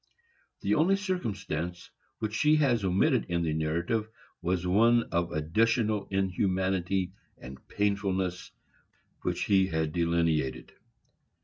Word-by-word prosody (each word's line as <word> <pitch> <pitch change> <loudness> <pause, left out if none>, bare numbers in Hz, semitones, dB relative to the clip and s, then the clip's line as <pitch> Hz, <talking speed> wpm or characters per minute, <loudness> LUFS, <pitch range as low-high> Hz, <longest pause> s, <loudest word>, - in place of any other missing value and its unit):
The - - +1
only 175 +6 +4
circumstance 100 - -4 0.3
which 105 -1 -3
she 150 +6 +3
has 130 -8 +2
omitted 100 - +2
in 85 -1 -1
the 80 -2 0
narrative 85 +8 -1 0.3
was 90 0 -1
one 115 +6 +4
of 85 -1 0
additional 105 +7 +1
inhumanity 95 -1 0 0.2
and 65 +2 -12
painfulness 95 -3 -1 0.7
which - - -1
he 95 -2 +3
had 80 -3 -1
delineated. 85 -6 0
95 Hz, 110 wpm, -29 LUFS, 85-110 Hz, 0.7 s, only